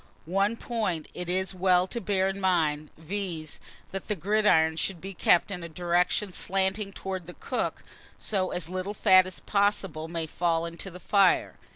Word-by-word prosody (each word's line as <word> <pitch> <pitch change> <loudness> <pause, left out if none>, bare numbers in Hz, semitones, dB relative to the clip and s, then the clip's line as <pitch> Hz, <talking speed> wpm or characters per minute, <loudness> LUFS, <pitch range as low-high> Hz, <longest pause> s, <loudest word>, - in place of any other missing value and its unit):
One 195 +6 +1
point 210 -11 -2
it 180 -1 -5
is 190 +2 0
well 180 -1 +3
to 235 +5 -5
bear 190 -1 +1
in 195 +1 -3
mind, 155 -5 +1
viz., 165 -2 -4 0.3
that 195 - -6
the 210 - 0
gridiron 180 -4 +3
should 180 +2 -2
be 195 +3 -7
kept 175 +1 +3
in 180 -3 -4
a 170 - -7
direction 180 +4 0
slanting 195 +2 0
towards 190 -3 -5
the 180 - -9
cook, - - -3 0.3
so 190 -3 0
that - - -4
as 175 -3 +1
little 185 +3 -4
fat 185 -1 +6
as 185 - -7
possible 200 -6 0
may 165 -1 -3
fall 165 +1 0
into 170 +3 -6
the 180 0 -11
fire. 195 0 +3
185 Hz, 180 wpm, -27 LUFS, 170-195 Hz, 0.3 s, fat